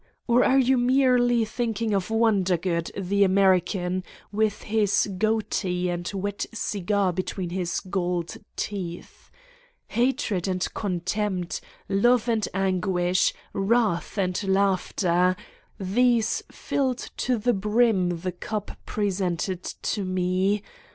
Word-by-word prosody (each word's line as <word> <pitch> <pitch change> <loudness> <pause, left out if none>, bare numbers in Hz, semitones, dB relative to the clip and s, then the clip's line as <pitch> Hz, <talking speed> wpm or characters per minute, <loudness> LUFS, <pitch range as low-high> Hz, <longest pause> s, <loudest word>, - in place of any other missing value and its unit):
Or 240 +1 +4
are 265 - +4
you 265 -1 +4
merely 245 -2 +3
thinking 225 -1 -2
of 195 -1 0
Wondergood, 190 -6 +1
the 200 +1 +2
American, 185 -1 +2 0.3
with 215 0 0
his 210 -2 +2
goatee 200 -5 0
and 175 0 -3
wet 200 0 -3
cigar 200 -3 0
between 185 0 -3
his 180 -1 -1
gold 180 -3 -2 0.2
teeth! 180 -4 -6 0.6
Ha 240 +4 +3
tred 200 -9 -2
and 185 -1 0
contempt, 185 -1 -2 0.3
love 235 +4 +3
and 225 -3 +1
anguish, 185 -1 +1 0.2
wrath 205 -2 +1
and 185 0 0
laughter, 185 -2 +2 0.4
these 230 +4 +2
filled 260 -3 -2
to 250 -1 +1
the 240 +3 +1
brim 200 -4 +2
the 185 0 -2
cup 205 +4 -5 0.2
pre 205 -1 0
sented 185 -1 -2
to 205 - -1
Me 185 +2 0
195 Hz, 115 wpm, -25 LUFS, 180-220 Hz, 0.6 s, Or